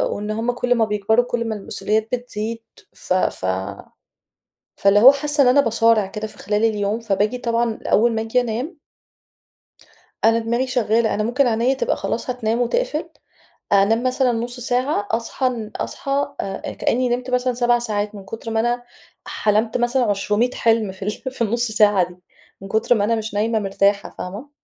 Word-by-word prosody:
وإن 210 Hz, +1 st, -4 dB
هُم 225 Hz, +3 st, -1 dB
كل 245 Hz, 0 st, 0 dB
ما 225 Hz, -2 st, +2 dB
بيكبروا 215 Hz, +3 st, +1 dB
كل 240 Hz, -1 st, -2 dB
ما 220 Hz, -, -2 dB
المسؤوليات 215 Hz, +1 st, -2 dB
بتزيد، 230 Hz, -2 st, -4 dB, 0.3 s
ف -, -, -3 dB
ف 185 Hz, -, 0 dB, 1.3 s
فاللي 200 Hz, +1 st, +4 dB
هو 260 Hz, +5 st, +10 dB
حاسة 290 Hz, +1 st, +1 dB
إن -, -, +4 dB
أنا 265 Hz, +3 st, +6 dB
باصارع 230 Hz, -4 st, +3 dB
كده 210 Hz, +2 st, -5 dB
في 215 Hz, -, -14 dB
خلال 210 Hz, +2 st, 0 dB
اليوم، 210 Hz, 0 st, 0 dB
فباجي 215 Hz, +2 st, 0 dB
طبعًا 235 Hz, -2 st, -1 dB
أول 235 Hz, +2 st, +3 dB
ما 220 Hz, -, -1 dB
أجي 225 Hz, +3 st, +1 dB
أنام 245 Hz, +9 st, -3 dB, 1.5 s
أنا 225 Hz, +1 st, +5 dB
دماغي 235 Hz, +3 st, -1 dB
شغالة، 235 Hz, -3 st, +1 dB
أنا 215 Hz, -, 0 dB
ممكن 245 Hz, +5 st, +1 dB
عينيا 235 Hz, +3 st, +2 dB
تبقى 485 Hz, -, -1 dB
خلاص -, -, -3 dB
هتنام 235 Hz, -2 st, -1 dB
وتقفل، 320 Hz, -, -1 dB, 0.6 s
أنام 205 Hz, +4 st, +3 dB
مثلًا 255 Hz, 0 st, +2 dB
نص 240 Hz, +2 st, -4 dB
ساعة 245 Hz, -3 st, 0 dB
أصحى 230 Hz, +4 st, -2 dB
أن 225 Hz, -4 st, -4 dB
أصحى 280 Hz, +1 st, -2 dB
آآ 195 Hz, -1 st, -5 dB
كأني 250 Hz, +1 st, 0 dB
نِمت 250 Hz, +1 st, -2 dB
مثلًا 250 Hz, 0 st, +1 dB
7 240 Hz, 0 st, +2 dB
ساعات 210 Hz, -2 st, -2 dB
من 200 Hz, -, -9 dB
كُتر 225 Hz, +2 st, -7 dB
ما 225 Hz, -, 0 dB
أنا 240 Hz, +1 st, 0 dB, 0.4 s
حلمت 215 Hz, +2 st, 0 dB
مثلًا 245 Hz, +1 st, +1 dB
عشرُمِية 210 Hz, +4 st, +1 dB
حلم 225 Hz, -3 st, +1 dB
في 190 Hz, +1 st, -8 dB
ال 210 Hz, -, 0 dB, 0.2 s
في 260 Hz, -, -9 dB
النُص 235 Hz, +1 st, 0 dB
ساعة 205 Hz, -4 st, +4 dB
دي، 180 Hz, -, -14 dB, 0.5 s
من 195 Hz, -, -8 dB
كُتر 220 Hz, +4 st, +2 dB
ما 205 Hz, -, +1 dB
أنا 230 Hz, +2 st, +2 dB
مش 220 Hz, -1 st, -4 dB
نايمة 220 Hz, +2 st, +1 dB
مرتاحة 200 Hz, 0 st, +1 dB
فاهمة؟ 205 Hz, +10 st, -7 dB
230 Hz, 175 wpm, -21 LUFS, 210-245 Hz, 1.5 s, هو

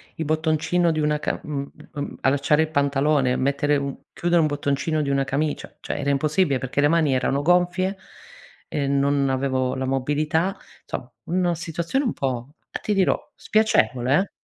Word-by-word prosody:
il 160 Hz, -, -3 dB
bottoncino 160 Hz, +3 st, +1 dB
di 155 Hz, -, -1 dB
una 150 Hz, 0 st, +1 dB
ca -, -, -2 dB
mhmm, 140 Hz, -2 st, -4 dB, 0.2 s
mhmm, 145 Hz, 0 st, -5 dB
allacciare 145 Hz, +3 st, +3 dB
il 160 Hz, -, 0 dB
pantalone, 140 Hz, -2 st, +2 dB
mettere 140 Hz, +2 st, +1 dB
un 140 Hz, -1 st, -1 dB, 0.2 s
chiudere 175 Hz, 0 st, +1 dB
un -, -, +5 dB
un -, -, +3 dB
bottoncino 145 Hz, +2 st, -1 dB
di 140 Hz, -, -1 dB
una 135 Hz, 0 st, +1 dB
camicia; 145 Hz, +3 st, -2 dB
cioè -, -, -4 dB
era 140 Hz, -, -1 dB
impossibile, 150 Hz, +1 st, +2 dB
perché 130 Hz, +1 st, -3 dB
le 145 Hz, -, +5 dB
mani 160 Hz, -3 st, +3 dB
erano 135 Hz, +2 st, +1 dB
gonfie 180 Hz, +4 st, +2 dB, 0.7 s
ehm, 140 Hz, -1 st, 0 dB
non 140 Hz, 0 st, +2 dB
avevo 130 Hz, -1 st, 0 dB
la 130 Hz, -, -2 dB
mobilità, 150 Hz, +8 st, 0 dB, 0.3 s
somm -, -, -5 dB, 0.2 s
una 175 Hz, 0 st, +1 dB
situazione 170 Hz, -, -2 dB
un 235 Hz, -, 0 dB
po', 135 Hz, -, -1 dB, 0.2 s
uhm, 145 Hz, -, -24 dB, 0.3 s
ti 210 Hz, -, 0 dB
dirò, 195 Hz, -2 st, +3 dB, 0.2 s
spiacevole 130 Hz, -, +2 dB
eh. 200 Hz, -, -5 dB
145 Hz, 175 wpm, -23 LUFS, 140-165 Hz, 0.7 s, un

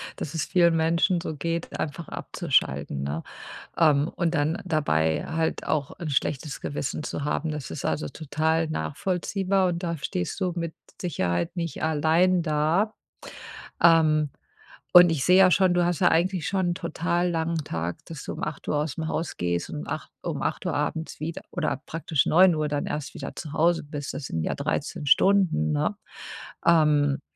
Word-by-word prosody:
dass 155 Hz, +2 st, -6 dB
es 160 Hz, -, 0 dB
vielen 170 Hz, -2 st, +3 dB
Menschen 170 Hz, +3 st, +2 dB
so 160 Hz, -2 st, -5 dB
geht, 165 Hz, +3 st, -3 dB
einfach 155 Hz, +2 st, -4 dB
abzuschalten, 70 Hz, 0 st, -1 dB
ne? 75 Hz, +4 st, -3 dB, 0.5 s
Ähm, 150 Hz, -2 st, +4 dB
und 175 Hz, -2 st, -1 dB
dann 155 Hz, +2 st, +1 dB
dabei 80 Hz, -, +1 dB
halt 160 Hz, 0 st, -2 dB
auch 145 Hz, -3 st, 0 dB
'n 170 Hz, -, -4 dB
schlechtes 145 Hz, +1 st, -1 dB
Gewissen 145 Hz, +1 st, -3 dB
zu 145 Hz, -, -4 dB
haben, 150 Hz, +2 st, -1 dB
das 150 Hz, -2 st, -5 dB
ist 145 Hz, -, -6 dB
also, 155 Hz, -, -1 dB
total 160 Hz, +1 st, -1 dB
nachvollziehbar 185 Hz, -, 0 dB
und 170 Hz, 0 st, -3 dB
da 170 Hz, -3 st, -2 dB
stehst 90 Hz, -, -3 dB
du 185 Hz, -2 st, 0 dB
mit 165 Hz, -1 st, -3 dB, 0.3 s
Sicherheit 90 Hz, -, -1 dB
nicht 170 Hz, -2 st, -3 dB
allein 160 Hz, +4 st, +3 dB
da. 160 Hz, +7 st, +1 dB, 0.9 s
Ähm. 155 Hz, -3 st, +5 dB, 0.6 s
Und 175 Hz, -1 st, +9 dB
ich 145 Hz, -4 st, 0 dB
sehe 180 Hz, +1 st, +5 dB
ja 185 Hz, -1 st, +7 dB
schon, 185 Hz, -1 st, +4 dB
du 175 Hz, -1 st, +3 dB
hast 175 Hz, -2 st, 0 dB
ja 180 Hz, -, +4 dB
eigentlich 175 Hz, 0 st, +1 dB
schon 190 Hz, -2 st, 0 dB
'n -, -, 0 dB
total 175 Hz, 0 st, -1 dB
langen 165 Hz, -1 st, -1 dB
Tag, 85 Hz, -, -3 dB
dass 160 Hz, -4 st, -8 dB
du -, -, -5 dB
um -, -, -7 dB
8:00 150 Hz, 0 st, -3 dB
ausm 155 Hz, +1 st, -2 dB
Haus 160 Hz, 0 st, -3 dB
gehst 85 Hz, 0 st, -1 dB
und 75 Hz, -, -5 dB
um -, -, -9 dB
8 -, -, -5 dB
um -, -, -3 dB
8:00 -, -, -2 dB
abends 160 Hz, 0 st, -3 dB
wieder 160 Hz, +2 st, -5 dB
oder 155 Hz, -6 st, -1 dB
praktisch 160 Hz, -2 st, 0 dB
9:00 165 Hz, -3 st, +4 dB
dann 145 Hz, -1 st, -2 dB
erst 150 Hz, +2 st, -4 dB
wieder -, -, -7 dB
zu 155 Hz, -3 st, -7 dB
Hause 170 Hz, +2 st, +2 dB
bist. 145 Hz, -1 st, -6 dB
Das 140 Hz, -, -5 dB
sind 80 Hz, -, -3 dB
ja -, -, -1 dB
13 150 Hz, -, -3 dB
Stunden, 160 Hz, -, +3 dB
ne? 75 Hz, -, 0 dB, 0.7 s
Ähm, 150 Hz, -4 st, +3 dB
160 Hz, 175 wpm, -26 LUFS, 145-175 Hz, 0.9 s, Und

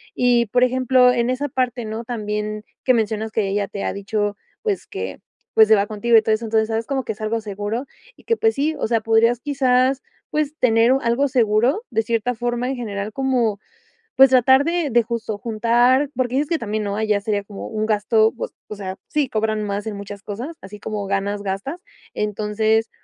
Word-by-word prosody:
Y 245 Hz, -1 st, +3 dB
por 245 Hz, +4 st, +2 dB
ejemplo, 255 Hz, 0 st, +4 dB
en 240 Hz, 0 st, 0 dB
esa 260 Hz, +3 st, -1 dB
parte, 250 Hz, -1 st, -1 dB
¿no?, 220 Hz, +1 st, -5 dB
también 210 Hz, -2 st, -3 dB, 0.2 s
que 255 Hz, -, +5 dB
mencionas 220 Hz, -1 st, -1 dB
que 220 Hz, -, +1 dB
ella 200 Hz, 0 st, -1 dB
te 200 Hz, +1 st, -6 dB
ha -, -, -1 dB
dicho, 205 Hz, +1 st, -2 dB, 0.2 s
pues, 420 Hz, -3 st, -2 dB
que -, -, -6 dB, 0.3 s
pues, 220 Hz, -1 st, +6 dB
se 220 Hz, -, +6 dB
va 200 Hz, 0 st, +2 dB
contigo 220 Hz, +3 st, +1 dB
y -, -, +6 dB
todo 220 Hz, 0 st, +1 dB
eso, 215 Hz, +2 st, -1 dB
entonces, 220 Hz, 0 st, +1 dB
¿sabes?, 225 Hz, 0 st, -1 dB
como 270 Hz, -2 st, -1 dB
que 220 Hz, -, -3 dB
es 215 Hz, -, -9 dB
algo 220 Hz, +1 st, -1 dB
seguro 210 Hz, +5 st, -4 dB, 0.3 s
y -, -, -21 dB
que, 460 Hz, -, 0 dB
pues, 445 Hz, 0 st, +2 dB
sí, 300 Hz, +3 st, 0 dB
o -, -, 0 dB
sea, 230 Hz, -1 st, +1 dB
podrías, 225 Hz, +2 st, +3 dB
quizás, 265 Hz, -1 st, +2 dB, 0.3 s
pues, 300 Hz, 0 st, -1 dB
tener 230 Hz, 0 st, +4 dB
u 270 Hz, -, +1 dB
algo 240 Hz, +5 st, +1 dB
seguro 245 Hz, -, +2 dB
de 225 Hz, -2 st, 0 dB
cierta 230 Hz, +2 st, -1 dB
forma 240 Hz, +2 st, -2 dB
en 270 Hz, -, -3 dB
general, 210 Hz, -3 st, -4 dB
como, 245 Hz, -5 st, 0 dB, 0.6 s
pues, 270 Hz, 0 st, +8 dB
tratar 260 Hz, +2 st, +5 dB
de 335 Hz, -2 st, 0 dB
de 240 Hz, 0 st, +4 dB
justo 225 Hz, -2 st, -4 dB
juntar 240 Hz, +5 st, +2 dB
porque 255 Hz, 0 st, -1 dB
dices 290 Hz, +1 st, +1 dB
que 330 Hz, -, +1 dB
también, 215 Hz, -1 st, -2 dB
¿no?, 200 Hz, -, -2 dB
allá 215 Hz, -2 st, +1 dB
sería 205 Hz, -1 st, -1 dB
como 200 Hz, -1 st, -8 dB
un 215 Hz, -1 st, -2 dB
gasto, 215 Hz, +1 st, +3 dB
u -, -, -3 dB
o -, -, -12 dB, 0.2 s
o 210 Hz, -, -7 dB
sea, 190 Hz, -2 st, -5 dB
sí, 295 Hz, -2 st, 0 dB
cobran 215 Hz, -1 st, -1 dB
más 205 Hz, +1 st, -3 dB
en 215 Hz, -, -4 dB
muchas 200 Hz, 0 st, -8 dB
cosas, 240 Hz, +11 st, -6 dB
así 200 Hz, +2 st, -10 dB
como 210 Hz, -1 st, -4 dB
ganas, 200 Hz, +1 st, -1 dB
gastas, 200 Hz, -, -4 dB, 0.3 s
entonces, 215 Hz, +1 st, 0 dB
225 Hz, 210 wpm, -21 LUFS, 210-255 Hz, 0.6 s, pues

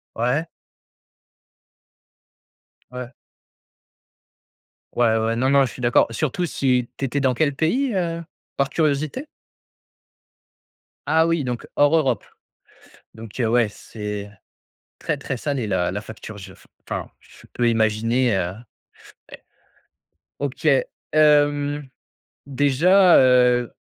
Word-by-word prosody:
Ouais. 125 Hz, +8 st, 0 dB, 2.4 s
Ouais. 125 Hz, 0 st, -7 dB, 1.8 s
Ouais, 120 Hz, -1 st, +3 dB
ouais, 110 Hz, 0 st, +2 dB
ouais, 115 Hz, 0 st, 0 dB
non, 130 Hz, +3 st, +1 dB
non, 140 Hz, -1 st, +4 dB
je 120 Hz, -, -6 dB
suis 125 Hz, -, -11 dB
d'accord. 120 Hz, 0 st, +4 dB
Surtout 155 Hz, +8 st, -2 dB
si 125 Hz, -6 st, 0 dB
tu 135 Hz, -, -2 dB
étais 140 Hz, +2 st, -2 dB
dans 130 Hz, -2 st, +2 dB
quel 140 Hz, +2 st, 0 dB
pays, 240 Hz, -, 0 dB
heu, 170 Hz, -2 st, -2 dB, 0.3 s
par 140 Hz, -1 st, +1 dB
curiosité? 155 Hz, -, -1 dB, 1.8 s
Ah 160 Hz, +2 st, +3 dB
oui, 165 Hz, -3 st, 0 dB
donc 125 Hz, -2 st, -4 dB
hors 145 Hz, +2 st, +4 dB
Europe. 135 Hz, -6 st, 0 dB, 0.9 s
Donc 110 Hz, +2 st, -9 dB
heu, 115 Hz, -, +1 dB
ouais, 120 Hz, -2 st, +3 dB
c'est 105 Hz, -1 st, -7 dB, 0.7 s
très, -, -, -2 dB
très 130 Hz, -, -5 dB
salé 135 Hz, -2 st, -3 dB
la 90 Hz, -2 st, 0 dB
la 105 Hz, -, -3 dB
facture! 110 Hz, 0 st, -10 dB
Je 95 Hz, -1 st, -11 dB
f -, -, -21 dB, 0.2 s
enfin -, -, -4 dB
je -, -, -19 dB
peux 120 Hz, -1 st, +1 dB
imaginer, 115 Hz, +2 st, +1 dB
heu, 90 Hz, -1 st, -1 dB, 0.8 s
ouais. -, -, -12 dB, 1.0 s
OK, 140 Hz, +2 st, -3 dB, 0.5 s
hem, 145 Hz, -1 st, +3 dB, 0.6 s
déjà, 160 Hz, +7 st, +4 dB
heu, 125 Hz, -2 st, +4 dB
130 Hz, 120 wpm, -22 LUFS, 115-150 Hz, 2.4 s, non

